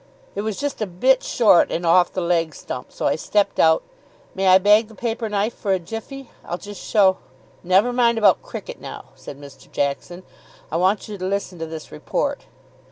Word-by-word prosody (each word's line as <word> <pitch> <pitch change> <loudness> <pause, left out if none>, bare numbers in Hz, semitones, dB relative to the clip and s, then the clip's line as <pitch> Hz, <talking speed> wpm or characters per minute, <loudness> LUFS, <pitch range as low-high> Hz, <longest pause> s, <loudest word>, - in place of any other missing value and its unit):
"It - - -3
was 215 -1 -3
just 285 -4 -3
a 215 - 0
bit 255 +9 +2
short 215 -7 +4
and 170 - -2
off 175 +1 +4
the 185 - -3
leg 170 -3 0
stump, 125 - -7
so - - -5
I - - +2
stepped 205 +5 0
out 160 0 +4 0.5
may 190 0 -1
I 185 0 +8
bag 210 +3 +4
the 220 - -15
paper 230 -1 -3
knife 210 +3 -1
for 200 -3 -1
a - - +2
jiffy? 225 +9 -8
I'll 175 - -4
just 205 +1 -10
show 195 -4 +3 0.2
" - - -31
"Never 215 +6 +4
mind 235 -2 +3
about 205 -5 +4
cricket - - -8
now," - - -9
said 140 - -11
Mr. 140 -2 -14
Jackson; 145 +6 -3 0.5
"I 160 - 0
want 190 +4 +1
you 205 -2 -7
to 185 - -4
listen 195 -2 -3
to 165 - -4
this 160 -1 -9
report." 75 - -3
195 Hz, 205 wpm, -22 LUFS, 170-220 Hz, 0.5 s, I